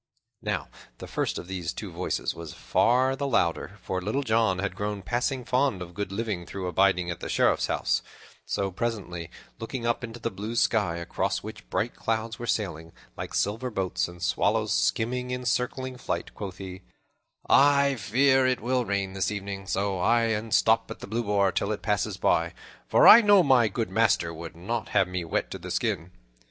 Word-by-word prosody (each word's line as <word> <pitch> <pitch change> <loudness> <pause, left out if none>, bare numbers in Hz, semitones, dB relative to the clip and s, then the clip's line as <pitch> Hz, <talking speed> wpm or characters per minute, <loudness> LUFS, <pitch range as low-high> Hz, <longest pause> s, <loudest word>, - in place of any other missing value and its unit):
Now - - -2 0.3
the - - -8
first - - -2
of - - -7
these 90 -2 -4
two 100 -4 -7
voices 85 +2 -2
was 85 -2 -9
far 130 +3 +2
the 140 +1 -2
louder, 100 -4 0
for 95 -1 -2
Little 110 +9 -1
John 110 -5 +2
had 95 0 -2
grown 105 0 -3
passing 125 +4 -1
fond 130 -5 +1
of 90 -1 -8
good 100 +1 -4
living 100 -4 -3
through 95 0 -5
abiding 90 0 +2
at 85 - -6
the - - -6
Sheriff's - - +2
house; - - 0 0.4
so, 100 -1 -2
presently, 90 -6 -4 0.3
looking 115 +1 -5
up 120 +1 0
into 115 0 -7
the 115 - -3
blue 105 +4 -5
sky, 105 -7 +2
across 85 - -2
which - - -9
bright - - -1
clouds 115 0 -2
were 120 - -5
sailing 85 -8 -2 0.2
like - - -6
silver 115 +5 0
boats, 95 -5 -1
and 85 0 -10
swallows - - +1
skimming 120 - 0
in 125 0 -4
circling 125 +1 -1
flight, - - -4
quoth 95 -2 -7
he, 95 -1 -8 0.7
"I 140 0 +5
fear 130 +4 +3
me 130 - +4
it 125 - -7
will 125 +2 0
rain 100 -2 -1
this 95 -1 0
evening, 100 -2 -5
so 95 0 -1
I'll 115 +5 +3
e'en 110 0 -2
stop 110 +1 +3
at - - -8
the - - -6
Blue 115 +3 -1
Boar 100 -2 +2
till 100 - -1
it 105 - -4
passes 105 -2 0
by, - - +1 0.3
for - - +6
I 230 - +11
know 205 -3 +6
my 130 -6 +5
good 110 +2 -3
master 110 -7 +2
would 85 0 -8
not 110 +7 -3
have 95 -2 +4
me 90 -1 -3
wet 80 - -2
to - - -5
the - - -8
skin." 80 +3 -1
105 Hz, 195 wpm, -27 LUFS, 95-120 Hz, 0.7 s, I